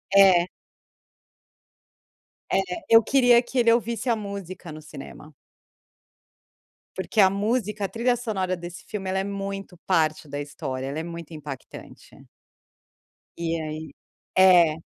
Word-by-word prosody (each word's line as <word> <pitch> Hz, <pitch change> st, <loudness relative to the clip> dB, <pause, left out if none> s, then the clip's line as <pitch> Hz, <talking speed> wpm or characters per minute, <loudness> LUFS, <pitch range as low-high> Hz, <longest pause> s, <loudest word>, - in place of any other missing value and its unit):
É. 185 Hz, -3 st, +7 dB, 2.0 s
É, -, -, +3 dB, 0.3 s
eu 225 Hz, 0 st, +8 dB
queria 245 Hz, 0 st, +5 dB
que 250 Hz, +2 st, -7 dB
ele 235 Hz, -2 st, +5 dB
ouvisse 235 Hz, +1 st, 0 dB
a 235 Hz, -, +4 dB
música 195 Hz, -5 st, -7 dB
no 155 Hz, 0 st, -9 dB
cinema. 150 Hz, +1 st, -11 dB, 1.6 s
Porque 190 Hz, +4 st, -2 dB
a 190 Hz, -, +7 dB
música, 210 Hz, 0 st, -1 dB
a -, -, -4 dB
trilha 245 Hz, +2 st, +1 dB
sonora 200 Hz, -6 st, -2 dB
desse 175 Hz, 0 st, -9 dB
filme, 195 Hz, -3 st, -4 dB
ela 190 Hz, +1 st, 0 dB
é -, -, 0 dB
muito 195 Hz, -1 st, -5 dB
parte 155 Hz, -4 st, +1 dB
da 145 Hz, +1 st, -4 dB
história, 135 Hz, -2 st, -5 dB
ela 140 Hz, +3 st, -3 dB
é -, -, -3 dB
muito 170 Hz, -1 st, -8 dB
impactante. 150 Hz, -3 st, -10 dB, 1.1 s
E 165 Hz, -1 st, -1 dB
aí 155 Hz, 0 st, -6 dB, 0.4 s
é 180 Hz, -4 st, +7 dB
190 Hz, 130 wpm, -25 LUFS, 160-215 Hz, 2.0 s, eu